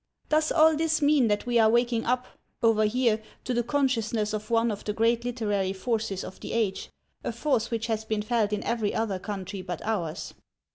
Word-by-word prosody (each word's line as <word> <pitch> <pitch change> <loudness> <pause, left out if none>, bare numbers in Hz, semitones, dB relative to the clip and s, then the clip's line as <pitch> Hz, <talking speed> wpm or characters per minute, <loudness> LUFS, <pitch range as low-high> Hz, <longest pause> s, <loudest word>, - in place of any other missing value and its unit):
Does 310 +1 +2
all 320 -1 +5
this 315 0 +1
mean 290 -4 +4
that 205 -1 0
we 240 -1 +2
are 220 -1 +6
waking 235 0 +2
up, 250 +1 +1 0.4
over 220 -1 +4
here, 225 -1 +2 0.2
to 250 - -2
the 240 - +2
consciousness 230 -5 0
of 215 +1 -4
one 230 0 +2
of 205 - -6
the 210 - -2
great 230 +2 +2
literary 205 -6 -1
forces 205 -1 -2
of - - -9
the - - -6
age, 215 -4 -1 0.3
a - - -2
force 235 -1 0
which 225 -1 -2
has 220 -1 -1
been 215 -1 -2
felt 215 -2 +1
in 210 -1 -2
every 225 -3 -1
other 215 -4 -1
country 195 -1 -5
but 180 -2 -5
ours? 185 -8 -3
225 Hz, 200 wpm, -27 LUFS, 210-240 Hz, 0.4 s, are